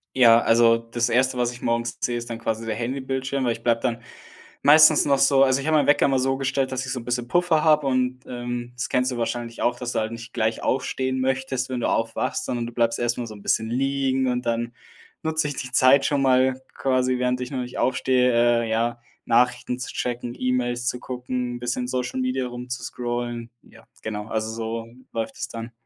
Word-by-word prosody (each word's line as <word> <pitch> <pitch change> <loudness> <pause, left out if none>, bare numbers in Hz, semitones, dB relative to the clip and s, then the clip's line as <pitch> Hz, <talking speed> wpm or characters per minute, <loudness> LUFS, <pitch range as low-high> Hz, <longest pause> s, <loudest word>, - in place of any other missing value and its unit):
Ja, 115 -2 +7
also 115 0 +5
das 115 +1 -2
erste, 130 +1 +2
was 120 0 0
ich 120 - -12
morgens 115 0 -1
sehe, 120 -1 0
ist 120 0 -6
dann 115 - -4
quasi 115 0 -3
der 110 -1 -2
Handybildschirm, 130 +2 -2
weil 120 - +2
ich 115 - -11
bleibe 115 -1 +2
dann 120 -1 -2 0.6
meistens 155 +1 +7
noch 140 -1 +3
so 135 0 +5
also, 135 +1 +2
ich 150 - -5
habe 155 -1 +4
meinen 145 - +2
Wecker 145 - +4
immer 135 -2 +2
so 135 +1 +1
gestellt, 135 0 -1
dass 130 0 -2
ich 130 - -4
so 125 - -3
'n 115 - -11
bisschen 120 0 -2
Puffer 175 -2 +2
habe 150 -3 +4
und, 130 -1 0
ähm, 120 0 -5
das 125 - -3
kennst 125 +1 +1
du 120 - -4
wahrscheinlich 115 0 -3
auch, 120 0 +1
dass 125 -1 -4
du - - +1
halt 110 +1 -2
nicht 115 0 -9
gleich 110 -1 -1
aufstehen 130 0 -1
möchtest, 130 0 -1
wenn 125 - -2
du - - +1
aufwachst, 115 0 -1
sondern 120 -1 -2
du 120 - -9
bleibst 115 -1 +1
erst 120 0 0
mal 120 - -3
so 110 - -8
'n 100 - -13
bisschen 110 +2 0
liegen 135 +1 0
und 125 0 -1
dann 115 0 -1 0.5
nutze 160 -1 0
ich 145 - -4
die 125 -3 -5
Zeit 135 +2 +5
schon 140 -2 +1
mal 130 0 +3
quasi, 130 -1 +1
während 125 0 0
ich 125 - -4
noch 130 - -3
nicht 125 0 -6
aufstehe, 125 0 +2 0.3
äh, - - -5
ja, 115 +1 0 0.3
Nachrichten 125 +1 +1
zu 130 - -5
checken, 120 0 -3
E-Mails 125 -1 -1
zu 125 - -1
gucken, 125 -1 -4
'n - - -7
bisschen 120 +1 -2
in - - -4
Social 125 0 -2
Media 130 0 -1
rumzuscrollen. 120 -1 -5
Ja, - - -18 0.2
genau, 105 -1 -4
also 110 0 -2
so 115 0 -4 0.3
läuft 115 -1 -4
es - - -4
dann. 115 0 -7
125 Hz, 225 wpm, -24 LUFS, 120-130 Hz, 0.6 s, Ja